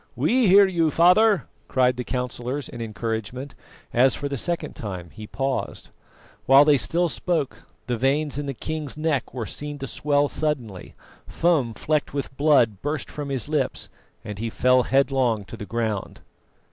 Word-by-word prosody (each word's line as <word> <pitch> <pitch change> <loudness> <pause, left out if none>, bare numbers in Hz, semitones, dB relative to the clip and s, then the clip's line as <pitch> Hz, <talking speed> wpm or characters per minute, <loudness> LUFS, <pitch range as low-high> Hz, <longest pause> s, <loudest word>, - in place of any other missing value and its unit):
"We 250 -2 +2
hear 200 +2 +8
you, 170 -4 +1
Father," 180 +6 +4 0.2
cried 125 -1 +2
the 125 - -4
councillors 125 +2 -4
in 120 - -8
encouragement, 115 +4 -4 0.4
as 130 +2 +4
for 145 - -4
the 140 - -3
second 170 +6 -2
time 90 -6 -6
he 105 -1 -10
paused. 135 +3 -3 0.6
While 135 +2 +8
they 145 -1 +5
still 175 +5 +1
spoke, 165 -3 -2 0.2
the 120 -1 -2
veins 140 +3 0
in 145 - -4
the 135 - -4
king's 150 +1 -5
neck 155 -5 -1
were 120 -3 -4
seen 145 +8 -6
to 135 - -5
swell 145 +3 +1
suddenly, 130 - -4 0.3
foam 150 -10 +1
flecked 150 +1 -1
with 140 -1 -4
blood 135 -9 +3
burst 145 -2 -3
from 145 -1 -5
his 135 -2 -2
lips, 150 0 -2 0.4
and 105 -1 -6
he 115 +1 -2
fell 125 +3 +3
headlong 130 -5 +1
to 85 - -9
the 105 - -8
ground. 110 -4 -3
135 Hz, 165 wpm, -24 LUFS, 120-150 Hz, 0.6 s, hear